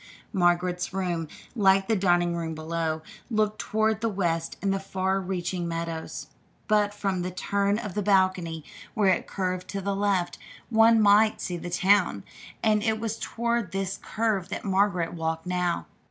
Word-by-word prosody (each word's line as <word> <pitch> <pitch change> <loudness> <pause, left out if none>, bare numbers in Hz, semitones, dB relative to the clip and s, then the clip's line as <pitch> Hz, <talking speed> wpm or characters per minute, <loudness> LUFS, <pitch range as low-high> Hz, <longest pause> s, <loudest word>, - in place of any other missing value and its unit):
Margaret's 180 -1 +1
room, 175 -4 -1 0.3
like 195 -3 +4
the 225 - +2
dining 175 -3 +2
room 165 -1 -3
below, 160 0 -2 0.3
looked 215 -2 0
toward 220 -1 0
the 230 - +1
west 170 -5 -1
and 195 -1 0
the 195 - -1
far 190 0 -1
reaching 180 -1 -3
meadows; 165 -1 -4 0.4
but 210 -1 +3
from 195 -3 -2
the 180 - -2
turn 200 +2 0
of 210 -5 -5
the 210 - -1
balcony 185 -5 +2 0.3
where 200 -4 +4
it - - -3
curved 185 -1 -3
to 200 - -4
the 195 +1 -2
left, 195 -3 0 0.3
one 225 0 +6
might 215 +1 +5
see 180 - -3
the 175 +1 -5
town, 180 - +3 0.4
and 215 -1 +3
it 220 0 0
was 225 0 -3
toward 235 -5 -2
this 195 0 -2
curve 215 -5 -1
that - - -5
Margaret 190 -3 +1
walked 160 -1 -3
now. 180 -1 -1
190 Hz, 165 wpm, -27 LUFS, 175-205 Hz, 0.4 s, one